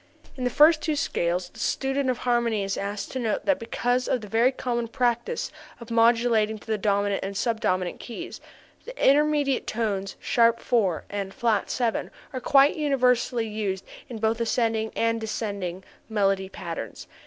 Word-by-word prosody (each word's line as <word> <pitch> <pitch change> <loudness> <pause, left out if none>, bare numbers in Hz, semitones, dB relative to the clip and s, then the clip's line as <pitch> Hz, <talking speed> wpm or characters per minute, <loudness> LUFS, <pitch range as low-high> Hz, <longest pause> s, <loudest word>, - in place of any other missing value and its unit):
In 255 -2 -3
the - - +2
first 310 +5 +5
two 310 -1 0
scales 175 -8 -1
the - - -15
student 270 0 0
of 250 - 0
harmony 235 -4 +1
is 195 0 -2
asked 200 0 -4
to 260 - -3
note 225 -4 -1
that 285 -2 +2
because 245 +2 -1
of 255 - +1
the 210 - -8
very 230 +5 +3
common 240 -3 -2
practice 245 - -1 0.3
of 235 -1 -10
modulating 230 -1 +3
to - - -16
the 220 -2 -1
dominant 200 0 +1
and 195 0 -4
sub 230 0 0
dominant 185 -3 0
keys, 295 +9 -8 0.4
the - - -10
intermediate 290 -1 +3
tones 200 -4 -2
[sharp]4 230 -6 +2
and 200 -1 -4
[flat]7 230 +1 0 0.2
are 255 - -4
quite 275 +2 +5
universally 250 -5 +2
used 205 -3 -3 0.2
in 235 - -6
both 220 +1 0
ascending 225 -1 0
and 230 0 +1
descending 200 -5 -4 0.3
melody 195 -3 +1
passages. 165 - -6
230 Hz, 160 wpm, -26 LUFS, 205-250 Hz, 0.4 s, first